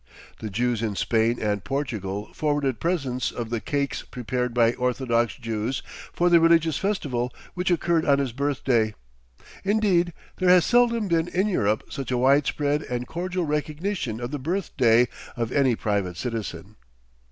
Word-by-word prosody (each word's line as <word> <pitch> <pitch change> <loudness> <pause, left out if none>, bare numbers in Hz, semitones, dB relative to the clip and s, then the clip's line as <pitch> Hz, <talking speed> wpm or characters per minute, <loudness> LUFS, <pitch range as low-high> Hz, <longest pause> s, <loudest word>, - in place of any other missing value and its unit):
The 110 - -5
Jews 120 +2 0
in 110 -3 -2
Spain 115 +3 +1
and 105 -3 -1
Portugal 105 -6 -3
forwarded 145 -4 0
presents 140 -8 -1
of 115 -2 -5
the 115 -2 -1
cakes 140 -1 -2
prepared 125 0 -3
by 115 -1 +3
orthodox 125 -2 0
Jews 115 +1 -3 0.3
for 175 - +1
the 175 -1 +6
religious 165 -2 +4
festival 135 -12 -1 0.2
which 180 +1 -1
occurred 170 -2 +2
on 140 -1 +4
his 140 -3 -1
birthday. 125 -4 0 0.7
Indeed, 195 -4 +2 0.3
there 185 -1 +2
has 180 -2 +6
seldom 235 -3 +3
been 165 -1 +1
in 190 +3 0
Europe 110 - +1
such 135 -3 -5
a 125 - +1
widespread 145 +3 +2
and 125 -3 -4
cordial 180 +4 -3
recognition 150 - -2
of 120 +1 -4
the 145 - -3
birthday 130 - +2 0.3
of 115 0 -2
any 135 -4 +3
private 100 -5 -1
citizen. 105 -4 -5
130 Hz, 150 wpm, -25 LUFS, 115-165 Hz, 0.7 s, the